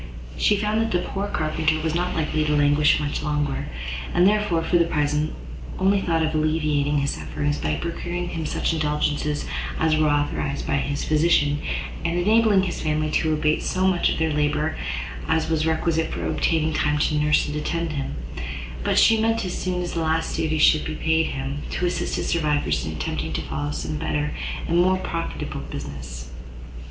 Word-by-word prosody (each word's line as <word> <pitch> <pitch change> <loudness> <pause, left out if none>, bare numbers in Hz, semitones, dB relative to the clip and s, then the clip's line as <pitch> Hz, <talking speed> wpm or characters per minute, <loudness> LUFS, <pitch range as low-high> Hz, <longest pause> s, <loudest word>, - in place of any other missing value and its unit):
She 210 - +3
found 210 +2 +1
that 225 - 0
the 180 -5 0
poor 200 +1 -3
carpenter 155 -2 0
was 160 -1 0
not 180 +1 -1
likely 155 -1 0
to 150 0 +2
languish 145 +1 +4
much 145 -1 -2
longer, 150 -2 -1 0.5
and 180 - +5
therefore, 205 -5 +2
for 175 +1 +2
the 170 - +4
present, 150 -1 0 0.5
only 195 +1 +3
thought 165 -3 +1
of 155 - -2
alleviating 155 -2 +1
his 140 0 +1
sufferings, 145 0 -2
by 75 -1 0
procuring 175 - -4
him 160 -2 -3
such - - 0
indulgences 150 -1 0 0.3
as 160 -1 +3
were 155 -1 +3
authorised 145 -1 -1
by 140 - +1
his 145 +1 -2
physician, 150 -2 +3 0.4
and 170 - 0
enabling 210 +1 +4
his 185 - -3
family 155 0 0
to 160 +1 +1
abate 155 0 +1
so 185 0 0
much 185 -2 +3
of - - -1
their 160 -1 +1
labour 150 +1 0 0.5
as 160 0 +1
was 160 0 +1
requisite 160 0 0
for - - -3
obtaining 160 -1 +1
time 150 0 +1
to 150 - +1
nurse 150 0 +3
and 145 - -4
attend 165 +2 -2
him: 135 - -3 0.7
but - - +1
she 225 -1 +6
meant, 225 -1 +1
as 180 - -3
soon 180 -1 -2
as 175 - -4
the 165 - -1
last 160 0 0
duties 155 -1 +1
should 155 - +5
be 155 - -4
paid 160 0 +1
him, 135 +1 -4
to 180 - -1
assist 175 - -1
his - - -2
survivors 150 -3 +1
in - - -3
attempting - - -3
to - - -1
follow 75 +3 -3
some 75 +1 -3
better 150 - -1 0.3
and 170 +1 +2
more 185 +1 +4
profitable 165 -2 -4
business. 65 -2 -7
155 Hz, 185 wpm, -24 LUFS, 150-170 Hz, 0.7 s, she